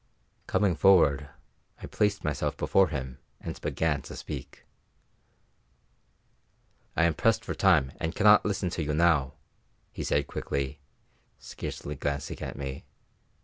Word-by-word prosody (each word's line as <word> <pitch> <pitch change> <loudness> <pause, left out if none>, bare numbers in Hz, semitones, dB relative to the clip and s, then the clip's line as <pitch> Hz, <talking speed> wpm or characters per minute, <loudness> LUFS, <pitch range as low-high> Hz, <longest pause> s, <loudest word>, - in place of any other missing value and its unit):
Coming 95 -5 +2
forward, 75 -6 +4 0.5
I - - -8
placed 105 -1 0
myself 75 -2 -2
before 95 -1 +3
him 65 -5 -5 0.2
and - - -7
began 80 -3 0
to - - -9
speak. - - -8 2.3
"I 85 - +3
am 85 -1 +3
pressed 115 +5 +1
for - - -3
time 80 -9 +3
and 80 +1 -3
cannot 105 0 +6
listen 95 -3 -1
to 85 - -2
you 75 0 -1
now," 75 -5 +2 0.6
he - - -5
said 70 -1 +1
quickly, 70 +1 -3 0.6
scarcely 75 - -6
glancing 70 -1 -4
at - - -5
me. 70 -1 -5
80 Hz, 130 wpm, -28 LUFS, 70-95 Hz, 2.3 s, cannot